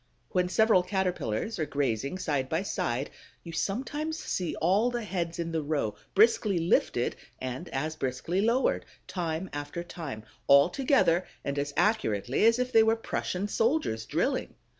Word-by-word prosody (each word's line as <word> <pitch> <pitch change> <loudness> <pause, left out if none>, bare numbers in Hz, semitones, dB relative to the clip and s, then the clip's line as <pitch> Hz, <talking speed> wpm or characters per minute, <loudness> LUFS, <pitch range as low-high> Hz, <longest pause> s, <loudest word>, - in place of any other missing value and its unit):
When 180 -1 +1
several 220 -1 +4
Caterpillars 180 - -2
are 155 - +1
grazing 140 +2 -1
side 140 -7 -1
by 160 +4 0
side, 130 -7 -2 0.3
you 170 - -8
sometimes 275 - -2
see 180 - -2
all 195 +8 +2
the 240 -1 -3
heads 170 -5 -3
in 170 -1 -3
the 160 -1 0
row 145 -8 -1 0.2
briskly 210 -2 +4
lifted 165 -7 +1 0.2
and 130 +7 -5
as 155 +4 -2
briskly 145 +7 -1
lowered, 235 +5 +2 0.2
time 170 0 -3
after 145 +4 -4
time, 155 -11 -7 0.2
all 140 0 +7
together 255 - +2 0.2
and 140 0 -1
as 145 0 -2
accurately 130 - +2
as 230 +1 +5
if 250 0 -1
they 225 - +8
were 220 0 +4
Prussian 205 -3 -3
soldiers 225 - 0
drilling. - - -1
175 Hz, 155 wpm, -29 LUFS, 145-215 Hz, 0.3 s, they